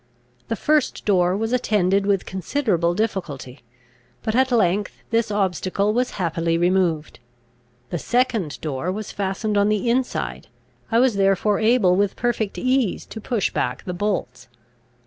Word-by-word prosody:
The 225 Hz, -, -1 dB
first 300 Hz, +6 st, +1 dB
door 185 Hz, -2 st, +3 dB
was 225 Hz, +3 st, -2 dB
attended 200 Hz, -5 st, +2 dB
with 195 Hz, -2 st, +1 dB
considerable 185 Hz, -, 0 dB
difficulty; 170 Hz, -, -3 dB, 0.6 s
but 220 Hz, -, -1 dB
at 260 Hz, +2 st, +2 dB
length 205 Hz, -3 st, +1 dB
this 230 Hz, 0 st, +1 dB
obstacle 200 Hz, 0 st, 0 dB
was 250 Hz, +2 st, 0 dB
happily 165 Hz, -2 st, 0 dB
removed. 175 Hz, -4 st, +1 dB, 0.7 s
The 175 Hz, -, -2 dB
second 235 Hz, -, 0 dB
door 155 Hz, +3 st, -2 dB
was 210 Hz, +2 st, -5 dB
fastened 205 Hz, +2 st, -2 dB
on 200 Hz, +1 st, +3 dB
the 215 Hz, +2 st, +1 dB
inside. 70 Hz, -, -2 dB, 0.4 s
I 225 Hz, -, +3 dB
was 240 Hz, -3 st, +3 dB
therefore 195 Hz, +1 st, +2 dB
able 220 Hz, -5 st, +4 dB
with 200 Hz, 0 st, +1 dB
perfect 230 Hz, -4 st, -1 dB
ease 255 Hz, -5 st, 0 dB
to 220 Hz, -, -9 dB
push 225 Hz, -3 st, -1 dB
back 125 Hz, 0 st, -2 dB
the 180 Hz, -, -4 dB
bolts. 175 Hz, -11 st, -3 dB
200 Hz, 145 wpm, -22 LUFS, 180-225 Hz, 0.7 s, able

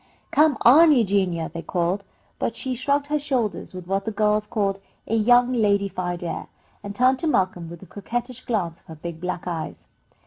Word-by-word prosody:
"Come 300 Hz, -2 st, +4 dB
on, 310 Hz, +7 st, +7 dB
Eugenia," 195 Hz, -, +1 dB
they 170 Hz, -, -5 dB
called, 180 Hz, +3 st, -1 dB, 0.4 s
but 230 Hz, -, -1 dB
she 260 Hz, +2 st, -3 dB
shrugged 280 Hz, +3 st, 0 dB
her 300 Hz, +1 st, 0 dB
shoulders 250 Hz, -9 st, -2 dB
with 185 Hz, -1 st, -8 dB
what 195 Hz, +2 st, -1 dB
the 220 Hz, -, -2 dB
girls 210 Hz, 0 st, +1 dB
called 200 Hz, -2 st, -1 dB, 0.3 s
a -, -, -4 dB
"young 245 Hz, +3 st, +4 dB
ladified 200 Hz, -5 st, 0 dB
air," 170 Hz, -, -4 dB, 0.3 s
and 200 Hz, 0 st, -7 dB
turned 255 Hz, +3 st, +3 dB
to 330 Hz, -, -1 dB
Malcolm 185 Hz, -, 0 dB
with 170 Hz, +1 st, -10 dB
a -, -, -11 dB
coquettish 240 Hz, +6 st, -5 dB
glance 185 Hz, -9 st, -2 dB
of -, -, -33 dB
her 160 Hz, -, -9 dB
big 165 Hz, +1 st, -7 dB
black 180 Hz, -1 st, -3 dB
eyes. 170 Hz, -3 st, -5 dB
205 Hz, 185 wpm, -24 LUFS, 180-245 Hz, 0.4 s, on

